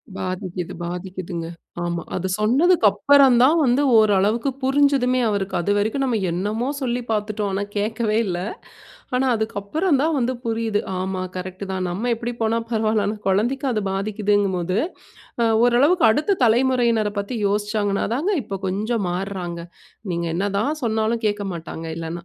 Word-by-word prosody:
பாதிக்கிது, 185 -1 -4
பாதிக்கிதுங்க, 175 -1 -5 0.4
ஆமா. 170 -1 -2
அது 185 +1 -2
சொன்னதுக்கு 275 +6 +3
அப்புறம் 270 +5 +5
தான் 310 +6 +5
வந்து 255 +1 +3 0.2
ஓரளவிற்கு 215 +4 +3
புரிஞ்சுதுமே 270 -2 +3
அவருக்கு 195 -2 -2
அதுவரைக்கும் 205 +8 0
நாம் 230 -6 0
என்னமோ 210 +8 -2
சொல்லி 245 -1 -1
பாத்துட்டோம், 210 -1 -1
ஆனா 200 - -1
கேட்கவே 215 +1 0
இல்ல. 180 -3 -2 0.8
ஆனா, 260 +1 +2
அதுக்கு 220 0 -3
அப்புறம் 310 - +1
தான் 320 +1 +1
வந்து 255 +1 0
புரியுது. 225 -2 0 0.2
ஆமா, 185 0 -2
கரெக்ட் 185 +2 -5
தான். 185 -1 -2
நம்ம 225 +7 -2
எப்படி 240 +1 -4
போனா 225 +1 +1
பரவால்ல. 220 -2 +1
ஆனா, 215 - -2
குழந்தைக்கு 240 +9 +1
அது 215 -3 -1
பாதிக்கிதுகும்போது, 200 -2 0 0.6
அ - - +4 0.2
ஓரளவுக்கு 275 +7 +4
அடுத்த 310 - +1
தலைமுறையினரை 235 -3 +2
பத்தி 200 +5 -5
யோசிச்சாங்கனாதானங்க 210 - 0
இப்ப 195 -1 -5
கொஞ்சம் 210 +3 -1
மாறுறாங்க. 180 -2 -4 0.5
நீங்க 170 0 -2
என்ன 200 +4 0
தான் 295 +8 -1
சொன்னாலும் 220 +1 0
கேட்க 205 0 -2
மாட்டாங்க 165 0 -7
இல்லனா. 165 +1 -5
215 Hz, 140 wpm, -22 LUFS, 195-245 Hz, 0.8 s, அப்புறம்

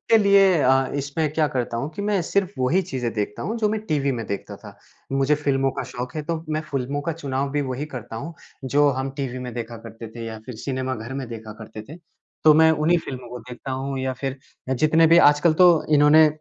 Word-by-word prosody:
के 225 - +8
लिए 195 -4 +5
अ, 135 +1 +4
इसमें 145 +2 -2
क्या 155 -1 +2
करता 120 -3 -2
हूँ 120 +5 -2
कि 200 - -4
मैं 205 -2 +1
सिर्फ़ 190 +2 0
वही 130 +9 +2
चीज़ें 130 -9 -3
देखता 105 -1 -3
हूँ, 225 +3 -3
जो 215 -2 +2
मैं 215 0 -1
टीवी 140 -3 0
में 115 -3 -4
देखता 100 - -5
था। - - -13 0.4
मुझे 135 +2 +3
फ़िल्मों 135 -2 +1
का - - -4
शौक 125 +4 -6
है, 155 - -2
तो 165 +1 -4
मैं 155 0 -1
फ़िल्मों 140 +1 -2
का 165 - -2
चुनाव 140 -3 -3
भी 145 +1 0
वही 130 +1 -3
करता 120 -6 -8
हूँ, 160 +8 -6 0.3
जो 145 +3 +3
हम 135 +1 -2
टीवी 130 -3 -3
में 125 -1 -6
देखा 115 -1 -5
करते 115 0 -9
थे, 115 +1 -8
या 110 -1 -6
फिर 125 - -7
सिनेमा 130 +2 -3
घर 115 +2 -7
में 135 -2 -4
देखा 110 -2 -8
करते 110 -1 -9
थे। 155 - -9 0.5
तो 155 - +8
मैं 160 +1 +6
उन्हीं 160 +3 +2
फ़िल्मों 130 -6 -7
को 125 +1 -7
देखता 125 +2 -9
हूँ, 135 +1 -3
या 130 0 -1
फिर 135 +1 -5 0.3
अ, - - +1
जितने 155 +5 +4
भी 165 +1 +6
आजकल 150 +3 +3
तो 180 +2 +7 0.3
इन्होंने 150 +2 +7
135 Hz, 235 wpm, -23 LUFS, 125-155 Hz, 0.5 s, के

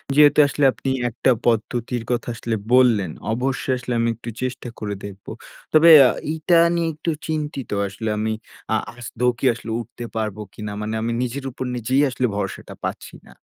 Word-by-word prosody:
যেহেতু 145 0 +6
আসলে 140 0 +1
আপনি 135 - -4 0.2
একটা 120 +3 +1 0.2
পদ্ধতির 120 +1 0
কথা 120 - -1
আসলে 115 0 -2 0.2
বললেন, 115 -9 +4 0.2
অবশ্যই 130 +1 -1
আসলে 125 0 -4
আমি 115 0 +2
একটু 115 +1 -8
চেষ্টা 130 -1 -3
করে 105 -1 -3
দেখবো। 100 -1 -10 0.4
তবে 155 +2 +7
অ্যা 130 -2 +8 0.2
এইটা 160 +2 +1 0.2
নিয়ে 170 -1 0
একটু 160 +2 -2 0.2
চিন্তিত 150 -4 -3 0.2
আসলে 110 +3 -4
আমি। 110 +1 -1 0.4
আ - - +4 0.2
আদৌ 120 +1 -2
আসলে 115 -1 -8
উঠতে 120 +1 -10
পারবো 110 -2 -2
কিনা? 105 -1 -6
মানে 105 +1 -3
আমি 115 +1 -1
নিজের 130 +3 -4
উপর 130 - -5
নিজেই 125 +4 +1
আসলে 125 0 -1
ভরসাটা 100 -2 -4
পাচ্ছি - - -5
না। - - -15
120 Hz, 170 wpm, -22 LUFS, 110-135 Hz, 0.4 s, অ্যা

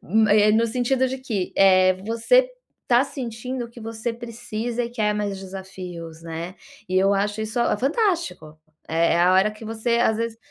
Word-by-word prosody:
m 215 +4 +2
eh, 210 0 +5
no 230 +2 +3
sentido 255 +3 +1
de 265 +1 -4
que, 220 -8 -3
eh, 185 -1 +6
você - - +3 0.3
está 245 +2 +3
sentindo 250 -2 -5
que 235 - -14
você 225 +1 -4
precisa 235 0 -4
e 235 - -4
quer 215 -3 0
mais 205 -2 -2
desafios, 185 -4 -8
né, 165 +2 -6 0.3
e 185 - 0
eu 195 +1 +4
acho 205 +2 -1
isso, 220 +2 -2
ah, 235 - +2
fantástico. 320 - -1 0.3
É 165 +1 +2
é 170 - +2
a 180 +1 +5
hora 190 +3 +4
que 215 +1 -12
você, 225 +2 -1
às 220 -2 +2
vezes, 230 0 -3
220 Hz, 185 wpm, -23 LUFS, 190-240 Hz, 0.3 s, eh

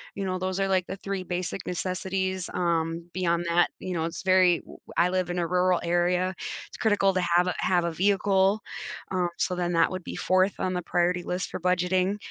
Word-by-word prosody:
You 200 - -3
know, 185 -1 -2
those 185 +1 -2
are, 195 - +2
like, 185 -2 +1
the 190 - -4
3 195 -1 -4
basic 180 +1 -4
necessities. 185 +1 -2
Um, 170 -1 -1
beyond 170 -1 0
that, 175 +1 +3
you 185 - -5
know, 165 -2 -1
it's 165 +2 -5
very 185 -2 +4
w - - -14 0.2
I 175 +1 +4
live 185 -1 0
in 175 - -3
a 170 - +1
rural 180 0 +2
area. 180 +2 +1 0.4
It's - - -11
critical 205 -3 +2
to 185 - +2
have 175 +1 +3
a 180 - -1
have 180 -2 +2
a 170 - -1
vehicle. 195 +3 +2 0.5
Um, 180 -2 +1
so 185 - 0
then 175 -1 -1
that 165 -1 +3
would 185 -1 -5
be - - -6
4th 185 +1 +2
on 185 - 0
the 180 - -1
priority 175 0 +1
list 180 +1 -3
for - - -4
budgeting. 185 +2 +1
180 Hz, 215 wpm, -27 LUFS, 175-185 Hz, 0.5 s, very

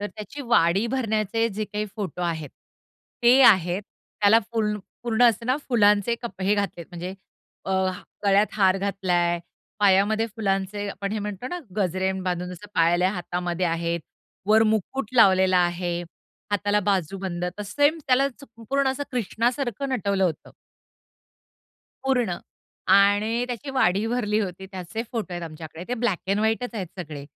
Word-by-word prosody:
तर 205 - -2
त्याची 215 +9 -8
वाडी 205 -4 +3
भरण्याचे 225 -3 0
जे 215 0 -3
काही 210 +1 -4
फोटो 190 -3 -4
आहेत 160 -4 -3 0.7
ते 245 +3 +6
आहेत. 190 -5 +5 0.4
त्याला 210 +2 +6
फूल 215 -2 0 0.3
पूर्ण 240 0 +1
असं 230 +1 -2
ना 255 - +2
फुलांचे 210 -2 +4
कप 195 -5 -7
हे 200 +2 +3
घातलेत, 200 -5 -3
म्हणजे 180 +1 -6 0.5
अ, - - -4 0.5
गळ्यात 200 +1 +4
हार 190 -2 +3
घातलाय, 180 -3 0 0.4
पायामध्ये 205 +3 +4
फुलांचे, 205 -2 -2
आपण 200 +1 -4
हे 220 - -1
म्हणतो 210 +3 -5
ना 355 - -4 0.2
गजरे 190 -1 0
बांधून 180 0 -2 0.2
पायल्या 175 +3 +3
हातामध्ये 180 -1 -2
आहेत, 170 0 -1 0.5
वर 220 +1 +6
मुकुट 220 +3 0
लावलेला 190 -5 +5
आहे. 175 0 0 0.5
हाताला 205 0 +1
बाजू 195 -2 0
बंद 180 -2 -3
तर - - -3
सेम 290 +10 +2
त्यालाच 270 +2 +3
संपूर्ण 270 +2 -2
असं 265 +2 -2
कृष्णा 235 0 0
सारखं 270 0 -3
नटवलं 200 -6 0
होतं. 165 -5 -3 1.5
पूर्ण 245 -9 +1 0.6
आणि 205 +4 +3
त्याची 250 +3 -5
वाडी 215 -6 +2
भरली 225 -3 0
होती 190 -1 -5
त्याचे 190 +4 -5
फोटो 225 -6 -3
आहेत 175 - -5
आमच्याकडे 160 +1 -9
ते 245 - 0
ब्लॅक 225 -7 0
एंड 195 +2 +1
व्हाईटचं 225 +2 0
आहेत 190 -3 -3
सगळे. 150 -4 -7
205 Hz, 145 wpm, -25 LUFS, 185-230 Hz, 1.5 s, ते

